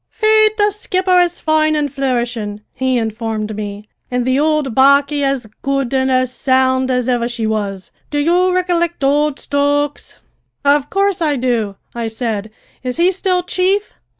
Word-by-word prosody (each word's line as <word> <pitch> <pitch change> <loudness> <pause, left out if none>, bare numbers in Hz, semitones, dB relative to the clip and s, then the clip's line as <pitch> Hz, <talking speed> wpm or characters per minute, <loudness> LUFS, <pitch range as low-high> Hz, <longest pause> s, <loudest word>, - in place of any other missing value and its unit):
"Faith, 435 0 +3
the 415 0 +3
skipper 370 -3 +1
is 350 -1 +1
foine 310 0 +2
and 290 -2 -1
flourishin'," 240 -6 -2
he 260 -1 0
informed 220 -1 -3
me, 205 0 -6 0.2
"an' 250 0 -1
the 260 +2 +1
ould 305 -4 +1
barquey 280 +3 +4
as 275 -3 0 0.2
good 275 -2 -1
an' 265 0 +1
as 255 -1 +1
sound 260 0 +1
as 250 -1 0
ivver 240 -2 +1
she 235 -2 -3
was. 205 -3 -3 0.2
Do 295 - -3
you 350 +5 +2
ricollict 345 -3 0
ould 290 +1 +2
Stokes?" 285 0 -1 0.5
"Of 285 0 +3
course 395 -1 0
I 300 -3 +1
do," 235 -6 -1 0.2
I 235 -1 -3
said. 220 -2 -3 0.3
"Is 250 -1 -4
he 350 +2 +4
still 365 -1 0
chief?" 380 +3 0
275 Hz, 160 wpm, -17 LUFS, 240-335 Hz, 0.5 s, barquey